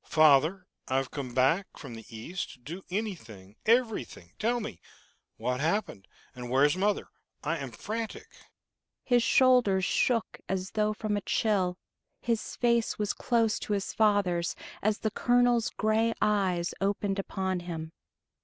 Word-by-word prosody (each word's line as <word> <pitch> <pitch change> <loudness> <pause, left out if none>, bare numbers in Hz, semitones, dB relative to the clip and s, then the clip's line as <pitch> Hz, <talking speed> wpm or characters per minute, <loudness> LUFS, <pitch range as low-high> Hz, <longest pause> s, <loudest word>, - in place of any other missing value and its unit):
"Father, 155 +4 +4 0.2
I've 130 0 0
come 130 -4 -5
back 150 +10 +2
from 135 -6 -9
the 115 -1 -10
East 115 +12 -5
to - - -16
do 165 +10 -8
anything, 115 - -5
everything. 225 - +1
Tell 240 +2 +1
me 90 - -7 0.6
what 125 0 -1
happened, 165 - -1 0.3
and 125 -1 -7
where 130 +3 +4
is 150 - +3
mother? 200 +2 0 0.3
I 165 +3 0
am 135 -2 -5
frantic!" 220 - -5 0.8
His 245 -2 +3
shoulders 230 -7 +4
shook 235 -3 +1
as 190 0 -2
though 215 0 +1
from 215 -1 -2
a - - -2
chill. 190 -4 +1 0.4
His 230 -2 -2
face 235 -1 +1
was 210 -1 -1
close 230 -3 +1
to 210 - -3
his 200 -1 -2
father's, 200 -6 +2 0.3
as 215 -1 +1
the 220 - -2
colonel's 245 -1 +3
gray 220 +1 +1
eyes 185 -4 +1
opened 200 0 0
upon 190 -1 -2
him. 165 -2 -6
195 Hz, 145 wpm, -29 LUFS, 155-220 Hz, 0.8 s, Father